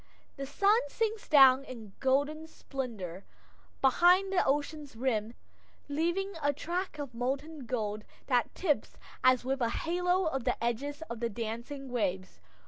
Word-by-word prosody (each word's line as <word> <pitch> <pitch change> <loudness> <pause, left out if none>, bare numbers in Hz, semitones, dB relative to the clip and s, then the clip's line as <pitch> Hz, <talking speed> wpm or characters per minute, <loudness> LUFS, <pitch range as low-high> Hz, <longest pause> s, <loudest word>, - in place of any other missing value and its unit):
The 275 0 -5
sun 400 - +4
sinks 440 +6 -2
down 270 -2 +7
in 225 -7 -10
golden 285 +4 +1
splendor 220 - -6 0.6
behind 360 +8 +5
the 365 - +4
ocean's 290 -1 -1
rim, 230 -2 -1 0.5
leaving 345 +7 -1
a 285 0 +2
track 345 +3 -3
of 285 -4 -6
molten 270 +3 -3
gold 215 -4 -2 0.2
that 245 -3 +1
tips 310 -6 0 0.3
as 255 -1 +4
with 270 0 -1
a 235 - +2
halo 355 +3 0
the 235 - -1
edges 280 +6 -2
of 235 -8 -7
the 235 0 -1
dancing 235 +5 -5
waves. 190 -6 -2
275 Hz, 135 wpm, -31 LUFS, 235-320 Hz, 0.6 s, down